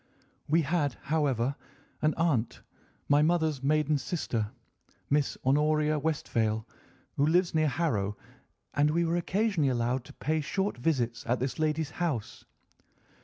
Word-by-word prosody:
We 165 +3 +3
had, 145 -3 0
however, 140 -4 +1 0.5
an 155 0 +2
aunt, 150 -9 0 0.4
my 145 +1 +5
mother's 160 -3 +2
maiden 150 +1 +2
sister, 120 - -2 0.6
Miss 145 -1 +1
Honoria 150 +2 +3
Westphail, 115 -8 -1 0.5
who 140 - +3
lives 175 +2 +3
near 155 -1 +3
Harrow, 115 -10 -1 0.6
and 145 +2 +3
we 170 +2 +2
were 165 +1 0
occasionally 185 -4 +1
allowed 125 +1 0
to - - -12
pay 155 +1 -1
short 195 +7 -1
visits 120 -5 0
at 120 +1 +1
this 130 +4 -3
lady's 155 -1 0
house. 145 -10 -3
150 Hz, 130 wpm, -29 LUFS, 130-160 Hz, 0.6 s, my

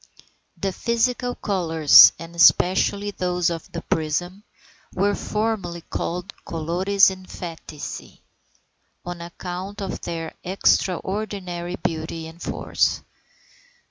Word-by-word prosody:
The 195 - -2
physical 245 +3 0
colours, 165 -6 +6
and 165 +1 -10
especially 190 +4 +4
those 180 -2 0
of 165 -1 -6
the 170 - -6
prism, 175 +5 -2 0.5
were 200 +2 +2
formerly 205 -6 -2
called 180 +3 -4
"colores 180 +5 +2
emphatici," 175 -5 -8 0.8
on 175 -1 -6
account 180 +3 -7
of 195 -2 -4
their 165 -1 -5
extraordinary 185 -1 -1
beauty 160 -1 -4
and 165 +2 -12
force. - - 0
180 Hz, 95 wpm, -23 LUFS, 170-200 Hz, 0.8 s, colours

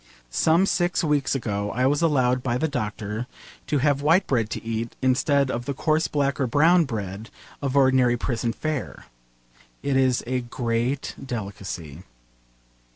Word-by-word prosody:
Some 165 - +3
six 175 -3 +1
weeks 145 -3 +1
ago 105 -5 -2
I 125 +2 +2
was 145 +3 +2
allowed 130 -6 +2
by 120 -1 -1
the 160 - 0
doctor 110 -3 -4 0.4
to 150 - +1
have 140 0 +2
white 165 +6 +4
bread 115 -5 0
to - - -5
eat 115 +1 -3
instead 130 +1 +2
of 120 +1 -3
the 140 - -3
coarse 155 +3 +1
black 140 -1 0
or 130 - +1
brown 165 +7 +4
bread 105 -3 -5 0.3
of 140 -1 -1
ordinary 130 -3 +4
prison 120 -1 -1
fare. 155 +2 -4 0.8
It 140 -1 0
is 130 -2 +2
a 125 +1 -1
great 120 +2 -2
delicacy. 100 - -6
130 Hz, 155 wpm, -24 LUFS, 115-145 Hz, 0.8 s, white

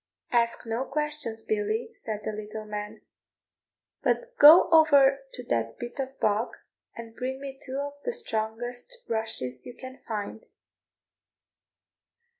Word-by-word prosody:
"Ask 235 -1 +1
no 230 +3 -1
questions, 295 -7 -2
Billy," 215 +2 -1
said 215 -2 -5
the - - -1
little 215 +1 -7
man, 210 +1 -6 1.0
"but - - 0
go 305 +4 +10
over 285 -4 +6
to 250 - -7
that 115 - -1
bit 240 +3 -7
of 265 0 -4
bog, 215 +3 +1 0.4
and 230 -1 -9
bring 260 +1 -3
me 275 -1 -7
two 265 0 -5
of 285 0 -3
the - - -1
strongest 245 - -3
rushes 220 - -2
you 245 - -9
can 260 0 -10
find." 215 0 -5
235 Hz, 130 wpm, -27 LUFS, 215-275 Hz, 1.0 s, go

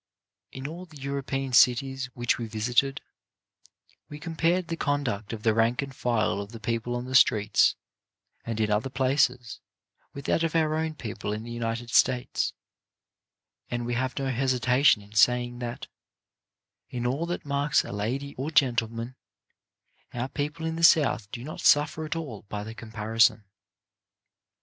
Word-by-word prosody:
In 130 0 -8
all 170 +5 -7
the 155 -3 -14
European 135 -1 -3
cities 130 +3 +4
which 120 0 0
we 115 - -3
visited, 120 +6 0 1.1
we 150 - -8
compared 165 +2 0
the 165 - -2
conduct 140 -10 -2
of 110 -2 -6
the 110 - +3
rank 115 +4 +2
and 135 -1 -8
file 110 -5 0
of 100 +1 -9
the 115 - -8
people 115 +2 -2
on 120 0 -4
the 130 - -7
streets 110 -5 +4 0.7
and 115 -1 -4
in 105 -1 +1
other 105 +5 0
places 130 -2 +1 0.5
with 140 0 -9
that - - +1
of 165 -1 -1
our 155 -1 +2
own 160 0 -1
people 110 -5 -5
in 105 +1 -4
the 120 - -8
United 120 0 -3
States, 125 0 +2 1.2
and 120 -1 -3
we 120 - -2
have 130 +2 -2
no 135 -1 -1
hesitation 125 -2 +3
in 100 +1 -17
saying 120 +2 +3
that, 120 -1 -5 1.0
in 125 -2 -4
all 140 +7 -1
that 175 -2 -4
marks 140 -1 +1
a - - -7
lady 125 +8 -3
or 140 +4 -2
gentleman, 120 -4 +1 1.0
our 120 +2 -2
people 150 +3 -4
in 160 0 -2
the 165 - -4
South 140 -10 +4
do 120 -2 -6
not 155 +4 -7
suffer 150 +2 +3
at 155 - -3
all 145 -11 -5
by 105 -1 -4
the 110 +1 -7
comparison. 110 0 +1
125 Hz, 160 wpm, -27 LUFS, 115-140 Hz, 1.2 s, cities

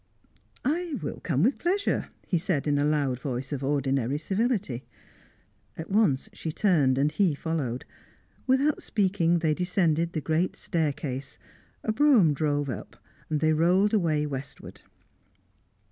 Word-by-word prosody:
"I 325 +3 0
will - - -4
come 150 -3 0
with 250 +7 +2
pleasure," 390 +4 0 0.2
he 175 - 0
said 160 -5 -1
in 145 -1 +1
a - - +2
loud 145 -4 +1
voice 130 0 -4
of 140 -1 -4
ordinary 135 -1 0
civility. 195 - -1 0.9
At 160 +4 -7
once 195 -11 +2
she 160 - -4
turned, 150 -9 +2
and 145 +2 +2
he 180 -6 +2
followed. 140 -6 -3 0.6
Without 275 +3 +2
speaking, 185 -5 +1
they 160 -2 +1
descended 170 -1 +1
the 160 - -1
great 160 +4 0
staircase; 145 -5 -3 0.5
a 220 - 0
brougham 220 - +5
drove 145 -1 0
up; 120 -8 -6 0.3
they 155 0 +2
rolled 180 +6 +3
away 160 -7 +2
westward. 140 -2 -7
160 Hz, 135 wpm, -27 LUFS, 145-195 Hz, 0.9 s, brougham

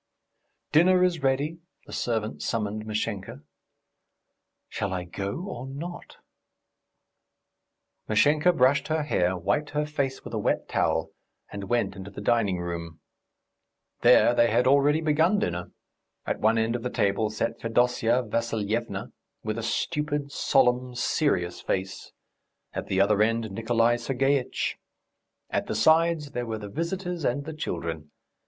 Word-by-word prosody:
"Dinner 180 +3 +5
is 175 -4 +1
ready," 140 +5 0 0.3
the - - -11
servant 110 -2 -2
summoned 110 -1 -2
Mashenka. 110 +4 -4 1.2
"Shall 100 -1 -3
I 90 -1 -2
go, 100 - -5
or 130 -8 -6
not?" 165 +6 -8 1.9
Mashenka 150 +10 +4
brushed 130 -2 +3
her 155 0 0
hair, 90 -10 +1
wiped 145 - 0
her 150 - +1
face 140 -3 -2
with - - -8
a - - -1
wet - - 0
towel, - - 0 0.4
and 100 -1 -6
went 120 -5 0
into 95 0 -8
the 100 - -9
dining 105 -3 +1
room. 85 -2 -5 1.0
There 120 - +6
they 120 -1 +4
had 120 +3 +2
already 140 +3 +4
begun 160 +6 +3
dinner. 90 - -2 0.5
At - - -2
one 110 +2 +3
end 115 +1 +1
of 120 - -3
the 125 - -2
table 100 0 +1
sat 110 +2 -2
Fedosya 120 +1 +2
Vassilyevna 115 0 -2 0.3
with 110 +1 -2
a - - -3
stupid, 145 +5 -2
solemn, 125 -2 +2
serious 105 - 0
face; 95 0 -3 0.6
at - - -4
the 95 - 0
other 100 +1 +4
end 115 0 +1
Nikolay 115 +2 +2
Sergeitch. 135 +2 0 0.7
At - - -1
the - - -2
sides 160 -2 +3
there 125 -3 -3
were 110 -1 -3
the 105 -1 -8
visitors 175 - -3
and 140 +3 0
the 160 - -5
children. 85 - -4
120 Hz, 140 wpm, -26 LUFS, 105-145 Hz, 1.9 s, There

